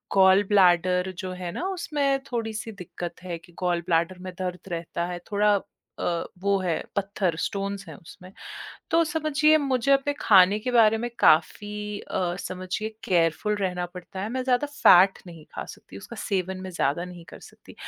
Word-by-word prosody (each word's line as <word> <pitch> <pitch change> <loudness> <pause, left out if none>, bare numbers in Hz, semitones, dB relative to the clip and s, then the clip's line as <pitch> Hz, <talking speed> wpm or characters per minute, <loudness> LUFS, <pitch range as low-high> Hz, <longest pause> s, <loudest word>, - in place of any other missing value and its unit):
Gall 190 +1 +6
bladder 180 -1 +4
जो 185 -2 -4
है 180 -1 -5
ना, 355 - -3
उसमें 295 -7 0
थोड़ी-सी 225 -1 -3
दिक्कत 175 +1 -8
है 175 -2 -4
कि 170 +1 -20
गॉल 175 -2 0
ब्लैडर 170 +2 +1
में 185 0 -7
दर्द 180 +1 -5
रहता 170 0 -3
है। 175 0 -5
थोड़ा 205 0 +3 0.4
अ, 170 -1 -1 0.2
वो 200 +1 +2
है 175 -3 -1
पत्थर, 195 -3 -1
स्टोन्स 200 0 -3
हैं - - -8
उसमें। 185 0 -14 0.6
तो 335 0 +4
समझिए, 310 -1 +2
मुझे 275 -2 +1
अपने 275 +1 +2
खाने 195 0 +6
के 250 - -2
बारे 225 -2 +5
में - - -1
काफ़ी 210 +5 +2
अ, 175 -1 -2
समझिए 185 +4 -4 0.2
केयरफुल 175 +4 +1
रहना 180 -3 -2
पड़ता 180 +1 -8
है। 200 - -3
मैं 255 +1 -2
ज़्यादा 255 +2 +2
फ़ैट 195 -10 +5
नहीं 165 -3 -11
खा - - -4
सकती। 95 - -12
उसका 235 - -10
सेवन 190 -2 -2
मैं 185 - -6
ज़्यादा 170 -1 -1
नहीं 180 -2 -10
कर - - -11
सकती। - - -15
190 Hz, 175 wpm, -25 LUFS, 180-220 Hz, 0.6 s, गॉल